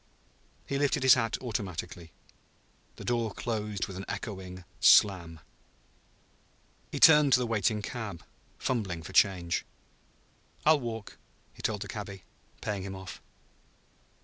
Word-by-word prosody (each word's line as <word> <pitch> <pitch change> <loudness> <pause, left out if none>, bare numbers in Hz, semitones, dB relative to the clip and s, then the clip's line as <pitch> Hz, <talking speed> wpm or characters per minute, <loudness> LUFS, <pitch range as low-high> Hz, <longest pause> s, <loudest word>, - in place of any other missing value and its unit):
He 140 - -2
lifted 140 -2 +1
his 130 - +8
hat 115 -3 0
automatically. 90 -7 -5 0.8
The - - -10
door 120 -2 0
closed 105 -4 -3
with 95 - -9
an 95 - -6
echoing 95 -4 -6 0.2
slam. 85 -6 +5 1.5
He - - -4
turned 150 -4 +7
to 125 - +6
the 125 - 0
waiting 110 -2 0
cab, 100 -7 -6 0.3
fumbling 95 -10 -2
for 95 - -9
change. 90 -3 +3 1.0
"I'll 155 0 +6
walk," 115 -4 -6 0.4
he - - -13
told 105 -3 -1
the - - -9
cabby, 100 -3 -7 0.4
paying 105 -2 -3
him 95 0 -6
off. 95 -1 -9
105 Hz, 125 wpm, -29 LUFS, 95-120 Hz, 1.5 s, his